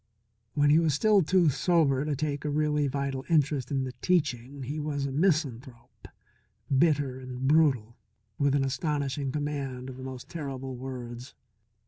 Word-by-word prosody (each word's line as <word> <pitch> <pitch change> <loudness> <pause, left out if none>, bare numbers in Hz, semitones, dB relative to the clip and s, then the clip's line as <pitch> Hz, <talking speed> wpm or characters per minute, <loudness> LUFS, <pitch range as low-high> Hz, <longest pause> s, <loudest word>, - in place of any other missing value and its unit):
When 145 0 +4
he 155 - +6
was 160 -4 +2
still 210 +5 +4
too 175 0 +3
sober 140 -1 +2
to 150 -1 -1
take 145 0 -2
a 150 - -1
really 150 0 +1
vital 135 -1 -2
interest 145 -5 +2
in 135 -2 0
the 130 - -4
teaching, 140 -6 0
he 145 +5 -4
was 145 -2 -2
a 140 - -3
misanthrope, 130 - -1 0.7
bitter 140 -3 +2
and 130 0 -4
brutal, 135 -7 +3 0.4
with 140 -1 +3
an 135 -1 +2
astonishing 140 -1 -1
command 135 -3 -3
of 130 - -11
the 130 - -8
most 130 -1 -7
terrible 135 -5 -5
words. 125 -1 -7
140 Hz, 155 wpm, -28 LUFS, 130-150 Hz, 0.7 s, he